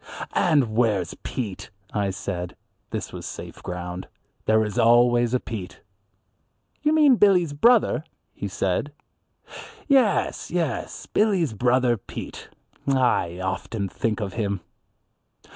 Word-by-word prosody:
"And 140 Hz, -10 st, +2 dB
where's 105 Hz, -7 st, +1 dB
Pete?" 105 Hz, -8 st, -5 dB, 0.2 s
I 100 Hz, -2 st, 0 dB
said. 90 Hz, -2 st, -4 dB, 0.3 s
This -, -, -5 dB
was -, -, -7 dB
safe -, -, -8 dB
ground. 90 Hz, +1 st, -5 dB, 0.4 s
There 110 Hz, 0 st, +3 dB
is 105 Hz, -, -3 dB
always 120 Hz, +1 st, +4 dB
a -, -, +2 dB
Pete. 100 Hz, -7 st, -7 dB, 1.0 s
"You 300 Hz, -, +2 dB
mean 300 Hz, -5 st, +5 dB
Billy's 180 Hz, -7 st, +4 dB
brother," 230 Hz, +1 st, +4 dB, 0.3 s
he 100 Hz, -, -5 dB
said. 95 Hz, +9 st, -1 dB, 0.9 s
"Yes, 265 Hz, -8 st, +2 dB
yes, 170 Hz, -4 st, -2 dB
Billy's 190 Hz, -, +1 dB
brother 120 Hz, +1 st, +2 dB
Pete. 95 Hz, -, -8 dB, 0.4 s
I 125 Hz, -10 st, +2 dB
often 100 Hz, +2 st, -2 dB
think 110 Hz, +3 st, -2 dB
of 100 Hz, -3 st, -3 dB
him." 100 Hz, -4 st, -2 dB
120 Hz, 115 wpm, -24 LUFS, 100-150 Hz, 1.0 s, mean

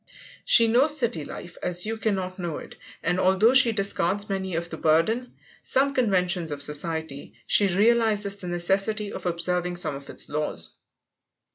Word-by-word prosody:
She 230 Hz, -, +6 dB
knows 270 Hz, +7 st, +4 dB
city 230 Hz, -, 0 dB
life 175 Hz, +4 st, -9 dB
as 180 Hz, +1 st, +2 dB
you 220 Hz, +1 st, -3 dB
cannot 190 Hz, -4 st, -3 dB
know 170 Hz, -3 st, -4 dB
it, -, -, -11 dB, 0.3 s
and, 180 Hz, +2 st, 0 dB
although 190 Hz, +6 st, +3 dB
she 255 Hz, -3 st, +6 dB
discards 200 Hz, -1 st, -1 dB
many 190 Hz, -2 st, -3 dB
of 170 Hz, +1 st, -4 dB
the -, -, -5 dB
burden 190 Hz, +11 st, +1 dB, 0.3 s
some 275 Hz, +1 st, +1 dB
conventions 180 Hz, -, 0 dB
of 145 Hz, -1 st, 0 dB
society, 150 Hz, -1 st, -2 dB
she 205 Hz, -, +3 dB
realizes 210 Hz, 0 st, +1 dB
the 185 Hz, -, -9 dB
necessity 195 Hz, +4 st, -1 dB
of -, -, -5 dB
observing 175 Hz, +1 st, 0 dB
some 175 Hz, -4 st, -2 dB
of 140 Hz, 0 st, -11 dB
its -, -, -5 dB
laws. 145 Hz, -, -4 dB
185 Hz, 160 wpm, -25 LUFS, 170-220 Hz, 0.3 s, She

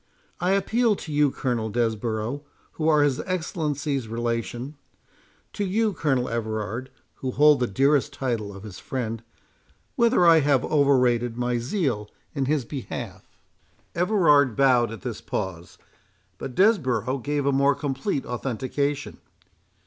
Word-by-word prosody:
I 180 Hz, +2 st, +2 dB
appeal 220 Hz, +3 st, +2 dB
to 155 Hz, -5 st, -7 dB
you, 145 Hz, 0 st, +4 dB
Colonel 120 Hz, -5 st, -2 dB
Desborough, 115 Hz, +3 st, -1 dB, 0.3 s
who 155 Hz, -, -2 dB
are 150 Hz, -2 st, +5 dB
his 140 Hz, -3 st, +1 dB
Excellency's 150 Hz, -, -2 dB
relation—to 120 Hz, -, -6 dB
you, 210 Hz, +2 st, +1 dB
Colonel 135 Hz, -7 st, 0 dB
Everard, 110 Hz, +2 st, -3 dB, 0.3 s
who 130 Hz, -, -3 dB
hold 150 Hz, +3 st, +5 dB
the 125 Hz, -, +1 dB
dearer 135 Hz, +7 st, +3 dB
title 125 Hz, -7 st, -3 dB
of 100 Hz, 0 st, -11 dB
his 105 Hz, -4 st, -9 dB
friend, 115 Hz, -6 st, -4 dB, 0.7 s
whether 235 Hz, -6 st, +4 dB
I 165 Hz, -1 st, +7 dB
have 140 Hz, -3 st, +2 dB
overrated 125 Hz, -5 st, +2 dB
my 125 Hz, 0 st, 0 dB
zeal 120 Hz, -, -1 dB, 0.2 s
in 140 Hz, -3 st, -1 dB
his 145 Hz, -2 st, 0 dB
behalf?" 135 Hz, 0 st, -6 dB, 0.7 s
Everard 165 Hz, -, +3 dB
bowed 125 Hz, -4 st, +4 dB
at 115 Hz, -, -8 dB
this 120 Hz, -4 st, -5 dB
pause, 90 Hz, -4 st, -5 dB, 0.6 s
but 130 Hz, -2 st, -6 dB
Desborough 135 Hz, -, +2 dB
gave 145 Hz, +2 st, -2 dB
a 140 Hz, -, +3 dB
more 140 Hz, +1 st, +3 dB
complete 140 Hz, +2 st, -2 dB
authentication. 135 Hz, +4 st, -3 dB
135 Hz, 130 wpm, -25 LUFS, 120-150 Hz, 0.7 s, I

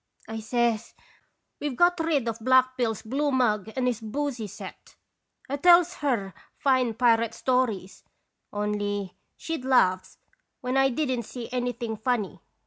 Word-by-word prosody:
"1 220 Hz, 0 st, -6 dB
says: 235 Hz, 0 st, 0 dB, 0.6 s
'We've 290 Hz, -3 st, -3 dB
got 350 Hz, +4 st, +3 dB
rid 310 Hz, -7 st, +1 dB
of 230 Hz, 0 st, -2 dB
Black 255 Hz, +2 st, +4 dB
Bill's 230 Hz, -5 st, -1 dB
blue 280 Hz, +6 st, 0 dB
mug 220 Hz, -5 st, +1 dB
and 260 Hz, -1 st, 0 dB
his 245 Hz, -2 st, 0 dB
boosy 240 Hz, -1 st, -3 dB
set.' 205 Hz, -, -11 dB, 0.5 s
"I 280 Hz, -, -2 dB
tells 350 Hz, +2 st, +6 dB
her 230 Hz, -, -1 dB, 0.2 s
fine 255 Hz, -4 st, +2 dB
pirate 230 Hz, -1 st, +3 dB
stories, 225 Hz, -8 st, -1 dB, 0.5 s
only 205 Hz, -2 st, -2 dB, 0.2 s
she'd 325 Hz, -5 st, -4 dB
laugh 185 Hz, -8 st, +2 dB, 0.4 s
when 250 Hz, +1 st, -2 dB
I 270 Hz, 0 st, +4 dB
did 270 Hz, +2 st, -1 dB
n't 235 Hz, -2 st, -4 dB
see 235 Hz, 0 st, -7 dB
anything 245 Hz, -3 st, -2 dB
funny. 215 Hz, -6 st, -1 dB
245 Hz, 140 wpm, -26 LUFS, 215-265 Hz, 0.6 s, tells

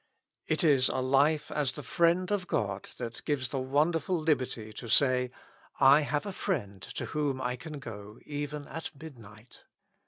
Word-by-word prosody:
It 155 Hz, +1 st, +1 dB
is 140 Hz, -5 st, +5 dB
a -, -, -2 dB
life 140 Hz, +4 st, +2 dB
as 145 Hz, -4 st, 0 dB
the 150 Hz, -, -7 dB
friend 170 Hz, +6 st, +2 dB
of 195 Hz, -3 st, 0 dB
God 100 Hz, -2 st, -2 dB
that 120 Hz, -1 st, -6 dB
gives 130 Hz, -4 st, 0 dB
the 135 Hz, -, -2 dB
wonderful 155 Hz, +6 st, +1 dB
liberty 130 Hz, -8 st, -1 dB
to 115 Hz, -, -8 dB
say, 125 Hz, 0 st, +4 dB, 0.5 s
I 140 Hz, +2 st, +7 dB
have 145 Hz, +2 st, -1 dB
a 200 Hz, -, -3 dB
friend 105 Hz, -, -2 dB
to -, -, -3 dB
whom 145 Hz, -3 st, -1 dB
I 125 Hz, -1 st, -1 dB
can 150 Hz, +4 st, -8 dB
go 105 Hz, -4 st, -9 dB
even 145 Hz, 0 st, -4 dB
at 165 Hz, -, -5 dB
mid 155 Hz, -6 st, -10 dB
night. 105 Hz, +2 st, -15 dB
140 Hz, 175 wpm, -30 LUFS, 125-155 Hz, 0.5 s, I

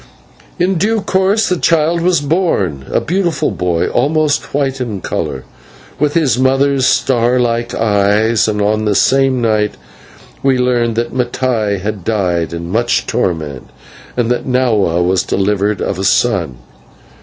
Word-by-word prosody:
In 180 Hz, -1 st, 0 dB
due 220 Hz, +3 st, +1 dB
course 195 Hz, +3 st, +1 dB
the 180 Hz, -, 0 dB
child 165 Hz, +1 st, +1 dB
was 175 Hz, -3 st, +2 dB
born, 140 Hz, -, -1 dB
a -, -, +2 dB
beautiful 170 Hz, -2 st, -1 dB
boy, 85 Hz, -2 st, -1 dB
almost 150 Hz, +3 st, 0 dB
white 135 Hz, -2 st, -1 dB
in 110 Hz, -6 st, -3 dB
colour, -, -, -4 dB, 0.6 s
with 150 Hz, 0 st, 0 dB
his 135 Hz, -8 st, +2 dB
mother's 135 Hz, 0 st, +2 dB
star 125 Hz, -1 st, +2 dB
like 120 Hz, -1 st, -1 dB
eyes; 105 Hz, +1 st, +2 dB
and 105 Hz, -1 st, 0 dB
on 110 Hz, +1 st, 0 dB
this 105 Hz, -2 st, +2 dB
same 135 Hz, -1 st, +2 dB
night 110 Hz, -2 st, +1 dB, 0.7 s
we 135 Hz, -1 st, +2 dB
learned 120 Hz, -2 st, +1 dB
that 120 Hz, +1 st, -2 dB
Mattai 120 Hz, -4 st, -1 dB
had 105 Hz, -2 st, -4 dB
died 90 Hz, -6 st, -1 dB
in 85 Hz, +1 st, -6 dB
much 120 Hz, +3 st, 0 dB
torment, 75 Hz, -7 st, -3 dB, 0.5 s
and 120 Hz, -1 st, +1 dB
that 125 Hz, -, -2 dB
Nahua 110 Hz, -9 st, +1 dB
was 90 Hz, 0 st, +2 dB
delivered 100 Hz, +1 st, -1 dB
of 95 Hz, -, -3 dB
a -, -, -2 dB
son. 65 Hz, -7 st, +1 dB
120 Hz, 145 wpm, -15 LUFS, 100-140 Hz, 0.7 s, was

